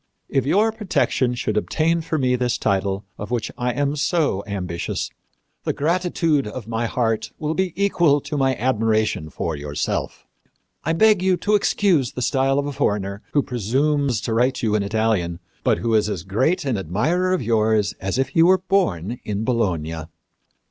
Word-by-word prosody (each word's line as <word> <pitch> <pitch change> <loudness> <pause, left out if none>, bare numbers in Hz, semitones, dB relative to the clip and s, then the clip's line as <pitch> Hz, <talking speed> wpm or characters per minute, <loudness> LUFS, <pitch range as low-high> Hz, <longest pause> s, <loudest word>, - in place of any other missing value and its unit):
If 135 -1 0
your 210 +8 +3
protection 140 - 0
should 120 - -2
obtain 165 +1 +1
for 160 0 -2
me 130 -3 +2
this 125 -1 0
title, 100 +1 0
of 105 - -5
which 120 -3 -2
I 125 0 -1
am 145 +3 -1
so 150 - 0
ambitious, 90 -4 -3 0.5
the - - -1
gratitude 165 -3 +1
of 110 +1 -7
my 115 0 -1
heart 115 -2 -1
will 155 0 -2
be 190 +1 0
equal 175 -7 +3
to 150 - -5
my 135 -2 +2
admiration 110 -8 0
for 80 +1 -3
yourself. 75 0 -3 0.6
I 160 - 0
beg 210 +2 +4
you 185 -1 +2
to 210 - 0
excuse 190 - +2
the 125 - -3
style 135 +1 +2
of 140 - 0
a 145 - -3
foreigner 100 -4 -1
who 145 - +3
presumes 130 +2 0
to 115 - -2
write 125 +3 +1
you 110 -2 +1
in 105 - +2
Italian, 100 -5 0 0.2
but - - +3
who 115 -1 -1
is 105 -1 +3
as 95 -5 -3
great 135 - 0
an 125 -7 0
admirer 150 - 0
of 185 -8 0
yours 110 -3 +2
as 95 +4 -2
if 135 -1 +1
he 165 - +2
were 185 +3 +6
born 125 - 0
in 105 +1 -3
Bologna." 90 -10 -1
125 Hz, 175 wpm, -22 LUFS, 105-155 Hz, 0.6 s, were